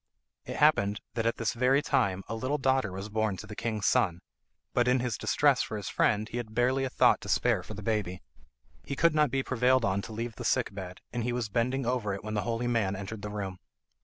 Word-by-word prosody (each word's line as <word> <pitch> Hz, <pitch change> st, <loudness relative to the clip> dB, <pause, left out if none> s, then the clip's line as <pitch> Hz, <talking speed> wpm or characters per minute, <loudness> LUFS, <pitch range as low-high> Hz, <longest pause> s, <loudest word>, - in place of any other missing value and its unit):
It -, -, -5 dB
happened 100 Hz, +1 st, +3 dB
that 115 Hz, 0 st, 0 dB
at 115 Hz, -, 0 dB
this 115 Hz, +2 st, -1 dB
very 130 Hz, +4 st, +3 dB
time 95 Hz, -10 st, +1 dB
a -, -, -4 dB
little 130 Hz, +6 st, -1 dB
daughter 130 Hz, -6 st, +1 dB
was 95 Hz, +2 st, -5 dB
born 110 Hz, -2 st, -1 dB
to -, -, -8 dB
the 105 Hz, -, -9 dB
king's 110 Hz, -2 st, -2 dB
son, 85 Hz, -1 st, +2 dB, 0.5 s
but 120 Hz, 0 st, +2 dB
in 125 Hz, +1 st, +4 dB
his 120 Hz, -3 st, -1 dB
distress -, -, +3 dB
for -, -, -3 dB
his -, -, -5 dB
friend 105 Hz, +1 st, +1 dB
he 120 Hz, -, -5 dB
had 115 Hz, -2 st, -6 dB
hardly 130 Hz, +2 st, +2 dB
a -, -, -2 dB
thought -, -, +4 dB
to -, -, -8 dB
spare -, -, +2 dB
for 110 Hz, -, -9 dB
the 105 Hz, -, -8 dB
baby. 100 Hz, -4 st, -2 dB, 0.6 s
He 140 Hz, -, -4 dB
could 170 Hz, +3 st, +3 dB
not 150 Hz, -2 st, +3 dB
be 135 Hz, +1 st, 0 dB
prevailed 130 Hz, -1 st, +2 dB
on 95 Hz, +1 st, +1 dB
to 110 Hz, -, -9 dB
leave 115 Hz, +1 st, -5 dB
the -, -, -6 dB
sick 125 Hz, -5 st, +1 dB
bed, 95 Hz, -2 st, -7 dB
and 120 Hz, -1 st, -1 dB
he 120 Hz, -, -1 dB
was 120 Hz, -3 st, -2 dB
bending 125 Hz, +4 st, 0 dB
over 115 Hz, -5 st, 0 dB
it 100 Hz, -, -9 dB
when 110 Hz, 0 st, -4 dB
the 105 Hz, -, 0 dB
holy 115 Hz, +1 st, -2 dB
man 115 Hz, -5 st, +1 dB
entered 100 Hz, +2 st, -6 dB
the 105 Hz, -, -5 dB
room. 100 Hz, -3 st, -5 dB
115 Hz, 245 wpm, -29 LUFS, 105-125 Hz, 0.6 s, in